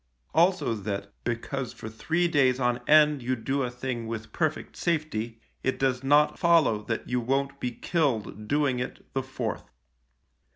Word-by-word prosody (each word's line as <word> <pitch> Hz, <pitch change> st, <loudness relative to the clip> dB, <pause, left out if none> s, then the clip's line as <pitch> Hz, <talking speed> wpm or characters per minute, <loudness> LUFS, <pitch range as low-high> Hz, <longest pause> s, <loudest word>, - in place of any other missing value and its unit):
Also 175 Hz, -6 st, +3 dB
that, 100 Hz, -1 st, -4 dB
because 120 Hz, +2 st, -3 dB
for -, -, -8 dB
three 160 Hz, +11 st, 0 dB
days 135 Hz, -6 st, +3 dB
on 125 Hz, -1 st, +1 dB
end 150 Hz, -2 st, +6 dB
you 130 Hz, +2 st, 0 dB
do 135 Hz, +4 st, -1 dB
a 125 Hz, -, 0 dB
thing 120 Hz, -2 st, -4 dB
with 110 Hz, -1 st, -6 dB
perfect 160 Hz, -2 st, -1 dB
safety, 145 Hz, -9 st, -2 dB, 0.2 s
it 130 Hz, -, 0 dB
does 130 Hz, -1 st, 0 dB
not 145 Hz, +2 st, +4 dB
follow 165 Hz, -, +4 dB
that 115 Hz, +1 st, -4 dB
you 125 Hz, 0 st, 0 dB
won't 140 Hz, +3 st, -1 dB
be 125 Hz, -, -1 dB
killed 120 Hz, -, -1 dB
doing 140 Hz, -1 st, +1 dB
it 125 Hz, -, -5 dB
the 135 Hz, -, 0 dB
fourth. 130 Hz, -4 st, -5 dB
130 Hz, 160 wpm, -27 LUFS, 115-145 Hz, 0.2 s, end